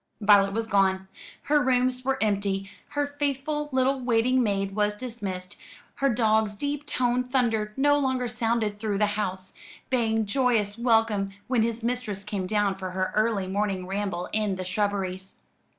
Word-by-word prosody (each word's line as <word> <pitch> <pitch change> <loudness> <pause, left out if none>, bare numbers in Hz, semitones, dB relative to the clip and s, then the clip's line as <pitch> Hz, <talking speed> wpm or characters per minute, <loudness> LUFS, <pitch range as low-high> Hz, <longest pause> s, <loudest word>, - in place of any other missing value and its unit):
Violet 200 -2 +5
was 225 +1 -1
gone. 190 -2 +2 0.4
Her 295 0 +3
rooms 255 -1 +1
were 270 +1 0
empty; 200 -1 -1 0.2
her 290 0 +2
faithful 290 +1 -1
little 265 +1 +2
waiting 250 +1 +2
maid 195 -3 -1
was 210 0 +1
dismissed; 200 -7 -6 0.4
her 275 0 +2
dog's 220 -2 +2
deep 290 +5 -3
toned 250 -1 0
thunder 225 -5 +1
no 290 +1 +4
longer 260 -3 0
sounded 225 -2 -1
through 210 -2 -1
the 210 - +3
house, 190 -3 -3 0.4
baying 225 -3 +1
joyous 220 -3 +1
welcome 225 -4 +2
when 250 -3 +1
his 230 0 -1
mistress 230 -5 -2
came 200 -3 -3
down 205 -1 0
for 185 -1 -4
her 185 0 -2
early 215 -2 +1
morning 195 -1 -1
ramble 190 -2 -3
in 210 -3 0
the 185 0 -5
shrubberies. 190 -1 -2
215 Hz, 155 wpm, -26 LUFS, 195-250 Hz, 0.4 s, Violet